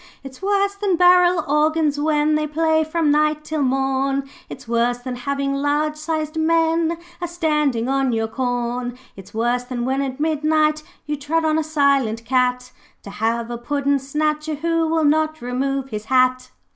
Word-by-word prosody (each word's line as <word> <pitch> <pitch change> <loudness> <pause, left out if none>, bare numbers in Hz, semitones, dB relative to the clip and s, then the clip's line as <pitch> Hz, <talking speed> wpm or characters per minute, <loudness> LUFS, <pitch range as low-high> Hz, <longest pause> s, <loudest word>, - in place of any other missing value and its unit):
'It's 270 +2 -11
worse 400 0 +1
than 400 -2 0
barrel 360 -1 +4
organs 300 0 +1
when 300 0 +2
They 305 0 0
play 315 +1 +1
from 315 -1 0
night 305 0 +2
till 305 0 -3
morn; 270 +1 0 0.2
It's 255 - -10
worse 235 +1 +1
than 250 0 -6
having 275 +2 -2
large 290 +2 0
sized 310 0 -3
men 330 +1 +2 0.2
A 350 - -2
standing 300 -8 0
on 270 -1 +1
your 225 -1 0
corn. 245 0 -3 0.2
'It's 195 -1 -12
worse 240 +2 0
than 245 -1 -4
when 265 +2 0
at 265 0 -4
midnight 310 0 +1 0.2
you 300 -1 -2
Tread 310 +3 -1
on 315 0 +2
a - - 0
silent 280 -7 +1
cat, 250 0 0 0.3
To 200 - -9
have 230 +3 -2
a 235 - -5
puddin' 280 +2 0
snatcher 305 +3 -2
who 330 +2 0
Will 320 -1 +1
not 310 +1 +1
remove 270 +2 -2
his 215 -2 -5
hat.' 255 0 +2
290 Hz, 170 wpm, -21 LUFS, 255-315 Hz, 0.3 s, barrel